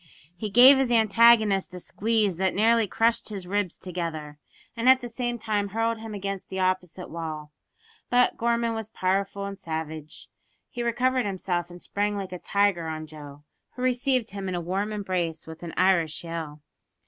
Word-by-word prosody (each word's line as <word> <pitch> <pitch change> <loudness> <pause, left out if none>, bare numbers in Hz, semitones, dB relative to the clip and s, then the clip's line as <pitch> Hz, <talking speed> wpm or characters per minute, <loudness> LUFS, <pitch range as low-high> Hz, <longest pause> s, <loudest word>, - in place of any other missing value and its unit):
He 210 +4 -4
gave 255 +6 +8
his 260 -2 +1
antagonist 220 -4 +4
a - - -6
squeeze 210 -1 0
that 190 0 0
nearly 225 +1 +3
crushed 230 +3 +1
his 195 -4 -6
ribs 200 -1 -1
together, 160 -5 -5 0.4
and 235 +2 +2
at 260 0 +7
the 245 - -6
same 240 0 -3
time 210 -3 -1
hurled 225 +2 -1
him 220 -1 -7
against 195 -1 -5
the 190 - -4
opposite 185 -1 -1
wall. 155 -2 -6 0.6
But 245 0 +3
Gorman 235 0 0
was 220 -1 -5
powerful 195 0 -1
and 200 0 -5
savage. 160 -1 -6 0.4
He 245 - -5
recovered 250 +1 +1
himself 180 -3 -2
and 175 0 -11
sprang 205 +3 -2
like 190 -2 -5
a 180 - -6
tiger 200 -5 +1
on 155 0 -5
Joe, 150 -2 -12 0.3
who 250 - -5
received 255 -2 +1
him 195 -1 -5
in 185 - -2
a - - -1
warm 190 +5 -2
embrace 180 -6 -2
with 160 0 -10
an 170 -1 -6
Irish 175 -5 +2
yell! 160 -3 -6
195 Hz, 175 wpm, -26 LUFS, 175-225 Hz, 0.6 s, gave